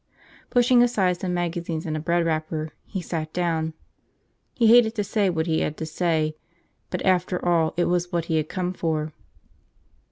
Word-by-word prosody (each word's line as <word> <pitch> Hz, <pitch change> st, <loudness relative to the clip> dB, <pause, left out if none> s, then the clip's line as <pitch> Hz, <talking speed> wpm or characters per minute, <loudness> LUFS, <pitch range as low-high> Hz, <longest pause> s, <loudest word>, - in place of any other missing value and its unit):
Pushing 245 Hz, 0 st, +4 dB
aside 195 Hz, -7 st, +2 dB
some 185 Hz, -, -2 dB
magazines 170 Hz, -2 st, -2 dB
and 155 Hz, -1 st, -2 dB
a -, -, -2 dB
bread 170 Hz, +2 st, +1 dB
wrapper, 155 Hz, -1 st, -2 dB, 0.2 s
he 190 Hz, -, -4 dB
sat 160 Hz, -2 st, -4 dB
down. 160 Hz, -3 st, -1 dB, 0.8 s
He 235 Hz, -, +2 dB
hated 230 Hz, 0 st, +6 dB
to 210 Hz, -, 0 dB
say 200 Hz, -1 st, +1 dB
what 160 Hz, -2 st, -1 dB
he 160 Hz, -2 st, +1 dB
had 155 Hz, -, -2 dB
to 160 Hz, -, -4 dB
say, 155 Hz, -1 st, 0 dB, 0.5 s
but -, -, -3 dB
after 180 Hz, -1 st, +1 dB
all 165 Hz, -2 st, +2 dB
it 175 Hz, -, +3 dB
was 175 Hz, 0 st, 0 dB
what 170 Hz, -2 st, -1 dB
he 160 Hz, -1 st, 0 dB
had 155 Hz, 0 st, -1 dB
come 180 Hz, -1 st, -2 dB
for. 155 Hz, -3 st, -2 dB
170 Hz, 180 wpm, -24 LUFS, 160-185 Hz, 0.8 s, hated